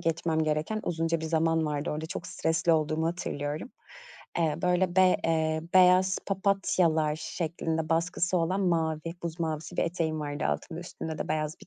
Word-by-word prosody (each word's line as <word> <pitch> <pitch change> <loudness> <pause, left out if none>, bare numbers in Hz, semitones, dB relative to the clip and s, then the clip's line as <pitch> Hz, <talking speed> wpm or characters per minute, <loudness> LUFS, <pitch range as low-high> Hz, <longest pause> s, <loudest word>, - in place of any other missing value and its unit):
geçmem 160 -1 0
gereken 155 +8 -1
uzunca 165 -1 0
bir - - -4
zaman 160 0 +2
vardı 145 -1 -2
orada, 155 +1 -3
çok - - -6
stresli 165 -1 +1
olduğumu 155 0 +1
hatırlıyorum. 155 - -3 0.7
Eee, 160 -3 +2
böyle, 180 0 +1
be 185 -1 +6
eee, 160 -1 +1
beyaz 185 +1 +6
papatyalar 185 -6 +1
şeklinde 160 -1 -3
baskısı 175 +2 +1
olan 185 +4 0
mavi, 165 -2 0
buz 170 0 -5
mavisi 160 +1 -3
bir - - +2
eteğim 165 -2 -1
vardı 145 0 -3
altımda, 165 0 -3
üstünde 160 -2 -6
de - - -4
beyaz 155 0 -1
bir - - -14
165 Hz, 160 wpm, -28 LUFS, 155-175 Hz, 0.7 s, be